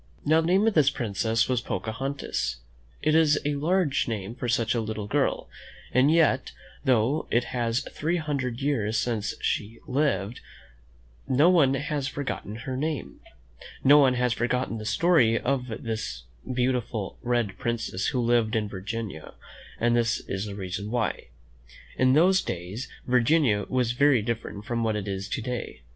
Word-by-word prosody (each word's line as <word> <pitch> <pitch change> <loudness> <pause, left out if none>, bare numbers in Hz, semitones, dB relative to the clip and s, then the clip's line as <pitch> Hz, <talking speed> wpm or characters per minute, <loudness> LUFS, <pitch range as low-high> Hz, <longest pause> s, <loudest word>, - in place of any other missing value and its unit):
Now, 160 +2 +4
the 160 - -2
name 190 +4 +3
of 225 - +3
this 150 -5 +5
princess 115 -2 0
was 125 -2 0
Pocahon 115 +9 -3
tas. 70 - -2 0.5
It 155 +1 +3
is 155 -2 +5
a 145 - +1
large 160 +1 +1
name 110 -2 -4
for 125 0 -5
such 115 -1 +1
a 120 - 0
little 110 -1 -4
girl; 105 - 0 0.4
and 130 +4 +4
yet, 160 -5 +2 0.3
though 130 +3 +2
it 120 +2 0
is 120 -1 0
three 165 +4 -1
hundred 140 -6 -3
years 115 -6 0
since 110 -3 -1
she 110 +3 -2
lived, 130 -7 0 0.9
no 140 +7 +5
one 140 -7 +4
has 145 -1 -2
forgotten 135 -6 -4
her 130 -2 -3
name. 150 +2 -3 0.6
No 145 +2 +8
one 130 -3 +4
has 125 -1 +1
forgotten 120 0 -1
the 110 - -7
story 115 - +3
of 130 -1 -1
the 110 -1 -4 0.5
beautiful 125 -5 -1
red 120 -6 -1
prin 120 0 0
cess 100 -4 -3
who 130 - 0
lived 115 -2 +2
in 110 -2 0
Virginia, 100 -3 -6 0.4
and 120 0 +2
this 115 -1 +1
is 100 +2 -4
the 100 - -6
reason 100 +1 -5
why: 120 -1 -2 0.7
In 130 0 +3
those 185 +6 +5
days 95 +9 -5 0.2
Virginia 125 -3 +3
was 125 -2 +1
very 130 -2 +3
different 110 -2 -4
from 115 0 -1
what 110 -1 0
it 105 -1 -3
is 100 0 -4
to 115 - -3
day. 125 - -5
120 Hz, 165 wpm, -26 LUFS, 110-140 Hz, 0.9 s, No